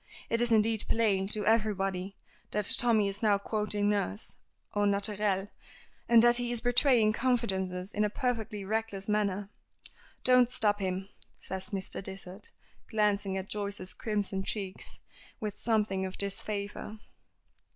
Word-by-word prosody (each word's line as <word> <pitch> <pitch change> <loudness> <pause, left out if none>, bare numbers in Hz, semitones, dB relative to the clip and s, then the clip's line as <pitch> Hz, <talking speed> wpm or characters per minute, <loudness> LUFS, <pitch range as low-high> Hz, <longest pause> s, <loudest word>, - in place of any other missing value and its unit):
It 230 +1 +2
is 240 -1 +4
indeed 220 -1 +3
plain 200 -4 +2
to 210 0 0
everybody 195 -3 +1 0.3
that 210 -1 +2
Tommy 225 -4 +3
is 200 +1 -4
now 210 -3 +4
quoting 210 0 -1
nurse, 200 - -1 0.4
au 205 0 +2
naturel, 200 -1 +1 0.6
and 235 -1 +7
that 240 0 +6
he 245 -1 -1
is 240 - 0
betraying 245 -2 +4
confidences 195 -6 0
in 210 - +1
a 210 - +2
perfectly 220 -4 -2
reckless 215 -2 -2
manner. 205 -1 0 0.7
"Don't 250 -1 +5
stop 210 -5 +1
him," 190 0 -2 0.3
says 190 0 -5
Mr. 195 -2 -2
Dysart, 190 +1 -6 0.4
glancing 205 -3 +1
at 190 0 -4
Joyce's 200 -3 -4
crimson 205 -3 -1
cheeks 195 -2 -4 0.4
with 210 -2 -4
something 210 -4 +1
of 185 - -9
disfavor. 200 +1 -3
205 Hz, 135 wpm, -30 LUFS, 195-220 Hz, 0.7 s, and